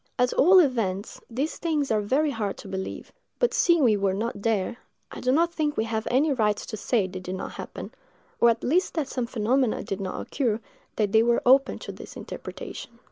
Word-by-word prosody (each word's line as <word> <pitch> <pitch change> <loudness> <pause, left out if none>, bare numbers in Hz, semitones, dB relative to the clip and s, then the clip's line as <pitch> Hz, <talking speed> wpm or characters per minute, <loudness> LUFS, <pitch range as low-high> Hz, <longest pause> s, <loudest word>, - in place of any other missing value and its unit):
At 250 -1 +2
all 365 +7 +6
events, 225 - +1
these 270 +7 -2
things 305 -6 -1
are 215 -1 +2
very 280 +8 +1
hard 210 -6 -3
to - - -10
believe; 190 0 -5 0.3
but - - +1
seeing 340 -4 +4
we 225 -4 +5
were 195 -2 0
not 215 0 -3
there, 225 +1 0 0.3
I - - -7
do 255 - +2
not 335 +5 +2
think 300 -3 -1
we - - +2
have 220 -1 -3
any 280 +4 +3
right 210 -4 +1
to 215 - -6
say 215 0 +1
they 185 0 -6
did 185 0 -5
not - - -5
happen; - - -8 0.5
or 235 - +6
at 230 0 0
least 355 +8 +1
that 310 -5 -1
some 250 -3 -3
phenomena 245 +1 +1
did 195 0 -4
not 190 -1 -4
occur, 235 -6 -1 0.4
that 210 -2 0
were 230 +2 +4
open 270 +2 +5
to - - -7
this - - -11
interpretation. 235 -1 -8
235 Hz, 205 wpm, -26 LUFS, 210-275 Hz, 0.5 s, all